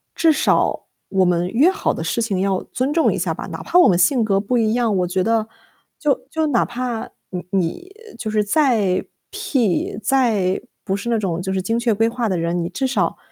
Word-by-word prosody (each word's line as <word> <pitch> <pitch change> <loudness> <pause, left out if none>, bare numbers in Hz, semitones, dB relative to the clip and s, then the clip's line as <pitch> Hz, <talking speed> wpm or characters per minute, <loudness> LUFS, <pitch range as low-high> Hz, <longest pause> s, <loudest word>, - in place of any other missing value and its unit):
至 325 -1 +4
少 - - +1 0.2
我 190 -1 +2
们 175 0 +1
约 275 - +4
好 400 - -1
的 - - -5
事 235 - -1
情 200 -5 -1
要 195 -1 0
尊 265 +3 0
重 325 0 +3
一 - - -3
下 - - -1
吧？ - - -7
哪 - - -7
怕 - - +1
我 - - +7
们 175 - +3
性 230 +7 +3
格 195 -2 +2
不 240 +5 0
一 220 -1 +2
样， 235 -4 +1
我 180 -1 +1
觉 185 +1 0
得 225 -1 +1 0.5
就 290 -4 +1
就 320 -1 0
哪 245 -5 +2
怕 240 -2 -4 0.2
你 180 -1 -5
你 195 - -2 0.3
就 215 - -4
是 215 -1 +2
再 215 - +2 0.3
P， 220 - -1
再 215 -7 +1 0.2
不 190 - 0
是 235 +4 -5
那 230 - +2
种 180 -4 -2
就 190 +1 -3
是 190 - 0
精 225 +5 -1
确 235 -2 +1
规 225 +2 +2
划 240 -1 -2
的 185 - 0
人， 170 +1 -1
你 170 - -3
至 265 +7 -1
少 265 - 0
220 Hz, 240 characters per minute, -20 LUFS, 190-250 Hz, 0.5 s, 我